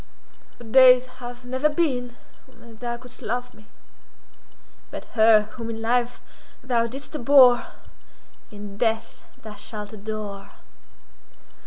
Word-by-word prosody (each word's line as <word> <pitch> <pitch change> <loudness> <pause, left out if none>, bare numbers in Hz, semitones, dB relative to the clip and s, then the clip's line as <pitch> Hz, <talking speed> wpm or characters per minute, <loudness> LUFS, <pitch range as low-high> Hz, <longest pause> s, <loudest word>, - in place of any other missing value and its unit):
"The - - -13
days 255 +2 +6 0.2
have 245 0 -9
never 260 +4 +1
been 260 -6 -1 0.3
when 235 -3 -17
thou 240 0 -4
couldst 250 +1 -13
love 245 +2 -4
me—but 215 - -17
her 220 -1 +6
whom 230 +1 -7
in 225 -1 -5
life 240 +2 0 0.4
thou 235 -3 +1
didst 270 +5 -9
abhor, 255 -3 +5 0.8
in 205 -1 -10
death 225 -1 -1 0.2
thou 215 -1 -9
shalt 210 +1 -8
adore." 210 -1 -7
235 Hz, 115 wpm, -24 LUFS, 220-250 Hz, 0.8 s, days